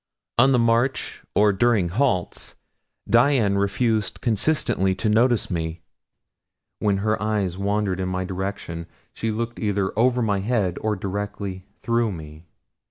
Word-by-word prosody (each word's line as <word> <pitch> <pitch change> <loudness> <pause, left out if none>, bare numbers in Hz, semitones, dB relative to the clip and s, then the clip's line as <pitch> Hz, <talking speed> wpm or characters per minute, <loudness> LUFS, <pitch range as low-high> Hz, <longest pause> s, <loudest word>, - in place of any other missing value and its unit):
On 135 +3 +6
the 130 - +4
march, 120 +3 +1
or 105 0 +4
during 105 -4 +2
halts, 95 -3 -1 0.5
Dian 115 -3 +3
refused 105 +1 0
consistently 110 -5 +1
to 105 +4 0
notice 115 0 +2
me 80 -1 -3 1.0
when 100 -2 +1
her 110 -2 +1
eyes 105 -4 0
wandered 100 -1 -1
in 95 0 -1
my 95 0 -2
direction 90 -3 -5 0.3
she 115 - -3
looked 115 +2 -3
either 100 -3 0
over 125 +2 +3
my 100 -3 +1
head 100 -4 0
or 110 -1 0
directly 100 -1 -5
through 115 -1 +1
me. 80 -1 -10
105 Hz, 135 wpm, -23 LUFS, 95-115 Hz, 1.0 s, On